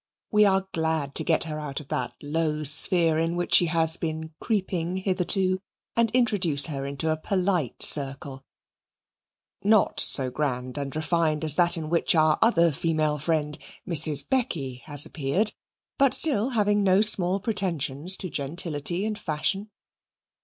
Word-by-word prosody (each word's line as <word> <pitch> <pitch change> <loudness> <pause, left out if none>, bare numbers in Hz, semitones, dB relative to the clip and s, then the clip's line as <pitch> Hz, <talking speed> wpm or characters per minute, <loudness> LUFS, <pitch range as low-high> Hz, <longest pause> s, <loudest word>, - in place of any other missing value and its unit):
We 210 0 +4
are 190 -1 +1
glad 160 -3 -2
to - - +3
get 165 - +2
her 155 -1 -6
out 145 -2 -6
of 150 - -14
that 125 - -4
low 155 0 -2
sphere 160 +2 +3
in 165 +1 -2
which 175 0 -3
she 175 - +5
has 160 0 +4
been 160 -1 -6
creeping 185 -5 -3
hitherto 185 0 +1 0.4
and 230 -1 +1
introduce 200 - +2
her 140 -4 -5
into 140 +3 -3
a 155 - -2
polite 180 - -2
circle 135 -1 -2 1.2
not 210 0 +2
so 130 -2 +2
grand 130 -1 -4
and 140 0 -6
refined 160 -1 -1
as 150 -2 -1
that 175 -1 +2
in 160 -1 -5
which 170 0 +1
our 155 -1 +2
other 170 -8 +3
female 155 0 -2
friend, 150 -1 -2 0.3
Mrs. 155 -4 +4
Becky, 150 - -3
has 145 -1 +3
appeared, 170 +9 -1 0.5
but 275 -2 +6
still 265 -7 +4
having 205 0 +1
no 190 0 +3
small 195 -3 +3
pretensions 180 - -1
to 185 - -7
gentility 160 +4 -2
and 215 -1 -4
fashion. 190 +7 -3
165 Hz, 155 wpm, -24 LUFS, 150-190 Hz, 1.2 s, but